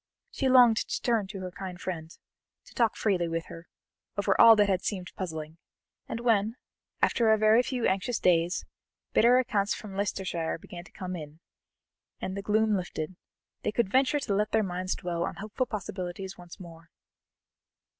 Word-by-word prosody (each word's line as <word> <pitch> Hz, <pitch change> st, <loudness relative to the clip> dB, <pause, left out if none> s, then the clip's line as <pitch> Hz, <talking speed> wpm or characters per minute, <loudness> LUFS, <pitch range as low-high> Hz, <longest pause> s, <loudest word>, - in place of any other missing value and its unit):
She 270 Hz, -, 0 dB
longed 245 Hz, -3 st, +7 dB
to -, -, -2 dB
turn 230 Hz, -5 st, +1 dB
to 195 Hz, -1 st, -7 dB
her 185 Hz, -1 st, -5 dB
kind 185 Hz, 0 st, -7 dB
friend, 165 Hz, -4 st, -5 dB, 0.6 s
to -, -, -17 dB
talk 230 Hz, -2 st, +2 dB
freely 185 Hz, -5 st, +1 dB
with 165 Hz, 0 st, -3 dB
her, 165 Hz, +1 st, -10 dB, 0.5 s
over 200 Hz, -1 st, +2 dB
all 230 Hz, -1 st, +10 dB
that 210 Hz, -1 st, +4 dB
had 190 Hz, -2 st, +1 dB
seemed 185 Hz, -3 st, -3 dB
puzzling, 160 Hz, -3 st, -6 dB, 0.5 s
and 230 Hz, -, -3 dB
when, 225 Hz, -2 st, +2 dB, 0.5 s
after 230 Hz, -3 st, +3 dB
a 220 Hz, -, +5 dB
very 215 Hz, +2 st, +5 dB
few 250 Hz, -1 st, -2 dB
anxious 195 Hz, +5 st, 0 dB
days, 175 Hz, +1 st, +2 dB, 0.5 s
better 240 Hz, +3 st, +5 dB
accounts 205 Hz, -5 st, +1 dB
from 205 Hz, -3 st, -9 dB
Leicestershire 190 Hz, -4 st, -2 dB
began 175 Hz, +1 st, -10 dB
to -, -, -17 dB
come 185 Hz, -2 st, -6 dB
in, 155 Hz, -1 st, -9 dB, 0.8 s
and 190 Hz, -, -4 dB
the 200 Hz, -, -3 dB
gloom 215 Hz, +1 st, +2 dB
lifted, 175 Hz, -2 st, -4 dB, 0.5 s
they -, -, -1 dB
could 210 Hz, -3 st, 0 dB
venture 270 Hz, +4 st, +3 dB
to 245 Hz, -8 st, -2 dB
let 210 Hz, +2 st, +1 dB
their 220 Hz, -1 st, +3 dB
minds 185 Hz, 0 st, -2 dB
dwell 170 Hz, -1 st, -4 dB
on -, -, -2 dB
hopeful 215 Hz, +5 st, -3 dB
possibilities 190 Hz, -3 st, -5 dB
once 175 Hz, -1 st, -13 dB
more. 165 Hz, -2 st, -12 dB
195 Hz, 175 wpm, -28 LUFS, 175-220 Hz, 0.8 s, all